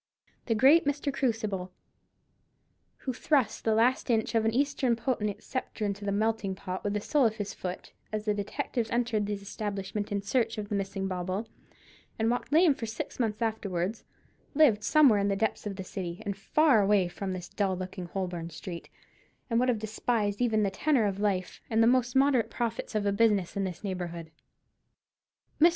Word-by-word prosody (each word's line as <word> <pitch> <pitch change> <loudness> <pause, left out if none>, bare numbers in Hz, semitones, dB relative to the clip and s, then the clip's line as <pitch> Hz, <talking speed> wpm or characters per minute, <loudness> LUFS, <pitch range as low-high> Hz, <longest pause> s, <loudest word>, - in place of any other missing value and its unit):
The 225 - +2
great 285 +9 +6
Mr. 285 0 -1
Krusible, 215 -8 -1 1.4
who 260 - -1
thrust 255 -3 +1
the 220 -1 +3
last 245 +4 +2
inch 225 -1 +1
of 225 -1 +2
an 225 - +3
Eastern 265 -1 +1
potentate's 225 -4 -2
sceptre 255 -4 -3
into 200 0 -3
the 200 - 0
melting 215 -1 0
pot 185 -1 -5
with 205 - -1
the - - +1
sole 280 +1 +3
of 220 - -3
his 205 -2 -4
foot, 180 0 -6 0.2
as 215 0 -3
the 210 - +2
detectives 220 +3 -2
entered 235 -3 0
his 205 -1 -4
establishment 205 0 -4
in 200 -1 -1
search 225 +2 0
of 205 -1 -5
the 205 - -1
missing 195 -1 -2
bauble, 185 +3 -3 0.7
and 225 +1 +2
walked 245 - -3
lame 320 0 +6
for 230 -4 -5
six 220 - -6
months 225 -1 0
afterwards, 205 -2 -2 0.5
lived 250 -9 +5
somewhere 275 -8 +5
in 200 - +1
the 200 - +1
depths 215 +1 -1
of 200 - -4
the 190 - -5
city, 185 +1 -6
and 200 -1 -2
far 255 +4 +3
away 195 -2 +3
from 190 +2 -4
this 180 -1 -6
dull 195 -3 0
looking 185 -1 -6
Holborn 175 -2 -4
street; 170 +1 -8 0.6
and 230 - +3
would 255 +1 +2
have 240 - +2
despised 215 -1 -1
the 245 - +3
even 220 -2 +2
tenor 255 +3 +2
of 200 -1 -1
life, 195 -3 -1
and 225 0 +3
the 250 +2 +5
moderate 265 -5 +4
profits 230 -2 -3
of 210 -1 +1
a 200 - +2
business 205 -3 +2
in 200 -1 0
this 180 0 -6
neighbourhood. 170 -4 -5 1.3
Mr. 335 - +9
215 Hz, 185 wpm, -29 LUFS, 195-235 Hz, 1.4 s, Mr